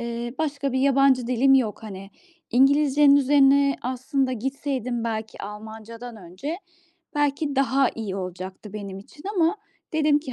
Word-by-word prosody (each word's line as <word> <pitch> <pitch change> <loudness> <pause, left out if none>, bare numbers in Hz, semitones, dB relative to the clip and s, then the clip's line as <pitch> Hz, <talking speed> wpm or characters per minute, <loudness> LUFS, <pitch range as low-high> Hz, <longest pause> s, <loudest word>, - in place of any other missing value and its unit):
eee, 235 +1 -4
başka 285 -3 -2
bir 260 - +1
yabancı 275 -2 +4
dilim 260 +2 +4
yok. 230 -5 +1
Hani 195 -1 -8 0.4
İngilizce'nin 280 +2 +5
üzerine 280 0 +4
aslında 260 +1 -1
gitseydim, 255 -1 -3
belki 220 -1 -4
Almanca'dan 220 +3 -9
önce, 195 - -6 0.6
belki 290 -1 0
daha 270 -1 +3
iyi 205 -4 -4
olacaktı 185 +2 -7
benim 200 -2 -6
için 295 +9 -16
ama 340 +3 +3 0.4
dedim 300 -1 +3
ki, 290 -4 -8
260 Hz, 135 wpm, -24 LUFS, 220-280 Hz, 0.6 s, İngilizce'nin